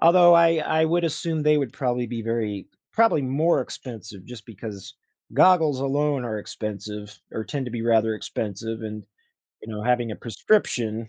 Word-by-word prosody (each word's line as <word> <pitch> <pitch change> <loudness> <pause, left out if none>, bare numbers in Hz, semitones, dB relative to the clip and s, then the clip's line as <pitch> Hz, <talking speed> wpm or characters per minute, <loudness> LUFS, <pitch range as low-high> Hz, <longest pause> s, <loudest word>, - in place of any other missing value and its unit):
Although, 175 +1 +7
I 165 -1 +5
I 160 +1 +1
would 170 +2 +1
assume 160 0 -2
they 150 0 +4
would 135 -5 -2
probably 125 -2 -1
be 115 -1 -5
very 110 -4 -2 0.3
probably 225 -8 +4
more 150 +6 +2
expensive 110 -6 -9
just 120 -3 -11
because 100 -3 -9 0.4
goggles 160 -7 +5
alone 140 0 0
are 110 -3 -3
expensive 105 0 -6 0.2
or 110 - -4
tend 135 +1 -4
to 125 - -5
be 115 -1 -4
rather 110 -1 +3
expensive 110 +1 -5
and, 105 -1 -6 0.6
you - - -10
know, 105 0 -5
having 120 0 +1
a - - -7
prescription, 115 - 0
120 Hz, 170 wpm, -24 LUFS, 110-150 Hz, 0.6 s, Although